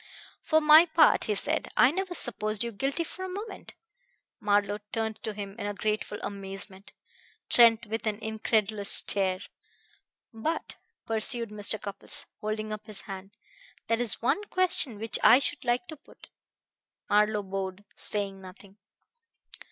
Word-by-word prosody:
"For 315 -1 +2
my 310 +3 +8
part," 320 0 +4
he 210 - -1
said, 310 +10 0
"I 260 - +6
never 370 +1 -3
supposed 215 -5 +1
you 235 - -4
guilty 270 +9 -1
for 370 +3 -8
a 375 - -5
moment." 410 +5 -8 0.6
Marlowe 205 0 +1
turned 220 -1 -3
to 220 - -4
him 200 -1 -7
in 205 -1 -4
grateful 210 0 -2
amazement, 195 0 -7 0.6
Trent 235 -1 +6
with 225 +1 -4
an 210 -1 -1
incredulous 215 -2 -1
stare. 190 -2 +4 0.9
"But," 310 +9 -4 0.3
pursued 230 +1 -1
Mr. 210 +1 +1
Cupples, 200 0 -5
holding 215 0 -4
up 215 +1 -8
his 215 -2 -4
hand, 195 0 -10 0.5
"there 230 +1 +1
is 230 -2 0
one 400 +12 +1
question 360 - +3
which 225 +2 0
I - - +8
should 280 +2 -2
like 245 +6 0
to 315 - -7
put." - - -19 0.8
Marlowe 210 0 +2
bowed, 195 +1 -5
saying 200 -2 -4
nothing. 190 +1 -14
215 Hz, 145 wpm, -28 LUFS, 205-245 Hz, 0.9 s, my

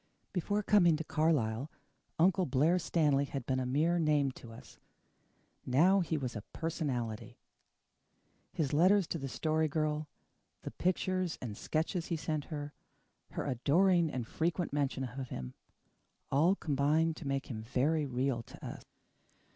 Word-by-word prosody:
Before 205 +3 0
coming 175 -7 +5
to 160 - -4
Carlisle, 145 -6 +1 0.5
Uncle 180 +2 +3
Blair 150 +7 +3
Stanley 150 -5 +2
had 135 -3 -5
been 130 0 0
a 130 - -2
mere 160 +7 +2
name 150 -4 +2
to 120 -2 -12
us. 115 - -14 0.8
Now 170 +10 +4
he 165 -3 0
was 130 -4 -4
a 105 - -4
personality. 120 -7 -4 1.1
His 150 -3 -1
letters 185 +5 +5
to 165 - -2
the 135 - -4
Story 155 +4 0
Girl, 155 0 -1 0.6
the - - -5
pictures 185 -1 -1
and 115 -5 -5
sketches 160 - -2
he 170 - -1
sent 155 -2 -2
her, 145 -2 -6 0.6
her - - -3
adoring 165 +7 +3
and 125 -5 -3
frequent 165 +5 -1
mention 140 -2 0
of 130 0 -5
him, 65 -1 -6 0.8
all 165 +8 +4
combined 155 +1 +1
to 145 - -7
make 135 0 -1
him 110 -4 -6
very 140 +6 0
real 130 -1 -1
to - - -12
us. - - -7
150 Hz, 145 wpm, -32 LUFS, 130-165 Hz, 1.1 s, coming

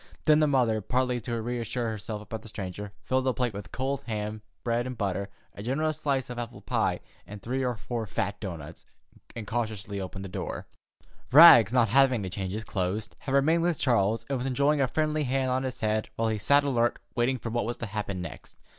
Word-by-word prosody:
Then 155 -1 +6
the 155 - +4
mother, 120 -6 +2
partly 125 +3 0
to 115 +1 -3
reassure 120 0 -2
herself 105 0 -5
about 110 +1 -6
the 115 - -12
stranger, 100 -1 -6
filled 130 0 0
a 130 - +3
plate 125 -3 -1
with 100 0 -8
cold 135 +2 -2
ham, 105 -1 -3 0.2
bread 120 +1 0
and 125 -2 -6
butter, 100 -1 -2 0.2
a - - -9
generous 155 +7 -1
slice 135 -4 0
of 120 - -5
apple 120 0 -6
pie, - - 0 0.3
and 105 0 -8
three 130 +5 -2
or 125 -1 0
four 115 +1 -4
fat 100 +1 -2
doughnuts, 85 -5 -7 0.5
and 115 - -5
cautiously 105 -3 -3
opened 95 +1 -6
the - - -7
front - - -17
door. - - -6 0.6
Rags, 125 - +10
not 120 -3 +3
having 130 -2 +4
to 95 - -5
change 95 0 -3
his 110 +1 -4
clothes, 100 +1 -2
had 135 0 -2
remained 160 +5 +4
with 170 -2 +1
Charles, 115 -4 +2
and 135 -1 -1
was 125 - -2
enjoying 140 +3 +2
a 135 - +3
friendly 155 +2 0
hand 130 0 0
on 130 +1 +1
his 130 -2 -4
head 110 0 0
while 115 0 0
he 110 -1 -1
sat 140 +7 +4
alert 120 -4 +1 0.2
waiting 125 +2 +1
for 115 -2 -5
what 120 -2 0
was 120 +1 -3
to 115 - -4
happen 100 -3 -4
next. 85 - -9
120 Hz, 215 wpm, -28 LUFS, 105-130 Hz, 0.6 s, Rags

